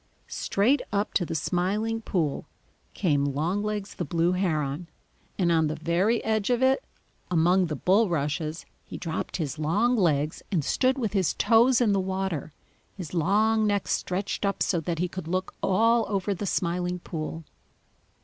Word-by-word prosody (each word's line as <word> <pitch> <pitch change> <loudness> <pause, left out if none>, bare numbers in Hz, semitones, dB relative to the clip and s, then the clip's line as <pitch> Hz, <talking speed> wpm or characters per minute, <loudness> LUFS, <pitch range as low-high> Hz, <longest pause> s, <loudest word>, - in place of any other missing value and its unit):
Straight 245 +8 +1
up 200 +1 -1
to 175 - +1
the 165 - -3
Smiling 205 +8 -1
Pool 165 -10 -2 0.5
came 145 -7 +1
Longlegs 195 +9 -2
the - - -4
Blue 170 +2 +1
Heron, 160 -4 -1 0.5
and 175 -3 +2
on 160 -2 +3
the 155 - -2
very 175 +8 +1
edge 220 -1 0
of 245 +1 +2
it, 265 +1 +3 0.5
among 180 +2 +3
the 155 - -3
bulrushes, 165 - 0 0.2
he - - -8
dropped 165 -2 -4
his 155 -2 -3
long 205 +11 +2
legs 155 -7 +1
and 165 -8 0
stood 260 +1 +2
with 225 -6 -2
his 190 -6 +1
toes 235 +2 +4
in 225 -4 +3
the 195 - +2
water, 190 -5 -2 0.5
his 180 -4 -7
long 215 +6 +2
neck 205 -1 0
stretched 190 +3 -2
up 200 -1 0
so 175 - +1
that 165 +1 -3
he 180 +3 0
could 185 -2 -7
look 185 +2 -2
all 225 +4 +3
over 200 0 0
the 200 +2 -4
Smiling 180 0 -1
Pool. 165 -1 -6
185 Hz, 160 wpm, -26 LUFS, 165-210 Hz, 0.5 s, toes